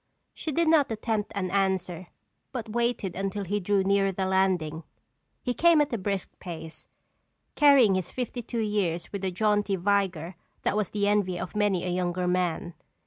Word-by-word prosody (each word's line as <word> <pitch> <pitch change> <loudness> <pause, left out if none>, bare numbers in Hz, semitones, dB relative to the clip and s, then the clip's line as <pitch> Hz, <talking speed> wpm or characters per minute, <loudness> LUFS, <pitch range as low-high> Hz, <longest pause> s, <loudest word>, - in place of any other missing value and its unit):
She 315 - -4
did 335 +3 +1
not 310 -6 +4
attempt 220 -1 -2
an 185 -2 -2
answer 185 -3 0 0.4
but 240 -4 -5
waited 235 -6 -1
until 195 +1 -2
he 205 +2 -1
drew 200 0 +1
nearer 195 0 +2
the 190 0 -2
landing. 185 -5 +1 0.6
He 250 - -1
came 340 +3 +5
at 295 -3 +1
a 230 - -1
brisk 195 0 -2
pace, 160 -3 -8 0.7
carrying 275 -8 +6
his 185 -2 -1
fifty 245 -1 -4
two 235 0 -3
years 190 -6 -1
with 200 -1 -4
a 190 - +1
jaunty 205 +1 +1
vigor 185 -3 0 0.3
that - - +1
was 210 -3 0
the 205 -1 0
envy 200 -4 +1
of 185 - -6
many 205 -4 +1
a - - -1
younger 180 0 -1
man. 180 -1 -1
195 Hz, 175 wpm, -27 LUFS, 180-215 Hz, 0.7 s, carrying